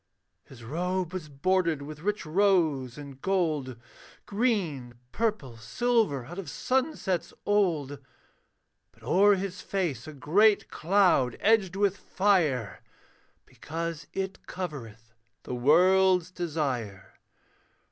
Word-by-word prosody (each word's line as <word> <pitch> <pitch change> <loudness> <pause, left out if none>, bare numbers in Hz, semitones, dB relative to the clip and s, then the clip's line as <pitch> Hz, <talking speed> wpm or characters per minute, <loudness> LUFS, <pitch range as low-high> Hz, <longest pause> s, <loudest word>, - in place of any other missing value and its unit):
His 120 -3 -14
robe 180 +7 -2
was 175 -5 -6
bordered 165 +1 0
with 150 +1 -9
rich 205 +3 -2
rose 155 -8 +1
and 140 -2 -10
gold, 155 -10 -1 0.5
Green, 185 - -1 0.2
purple, 205 - -2
silver 170 - 0
out 175 +8 -8
of 195 - -6
sunsets 255 - -1
old; 165 -9 +1 0.9
But - - -24
o'er 205 +2 +4
his 190 0 -5
face 165 - -3
a 155 - -8
great 200 +10 +3
cloud 170 - +2
edged 200 -4 +2
with 200 0 +1
fire, 165 - 0 0.6
Because 165 -1 -6
it 190 0 -5
covereth 115 - -7 0.3
the - - -6
world's 180 +7 +4
desire. 135 - -4
170 Hz, 105 wpm, -28 LUFS, 140-195 Hz, 0.9 s, o'er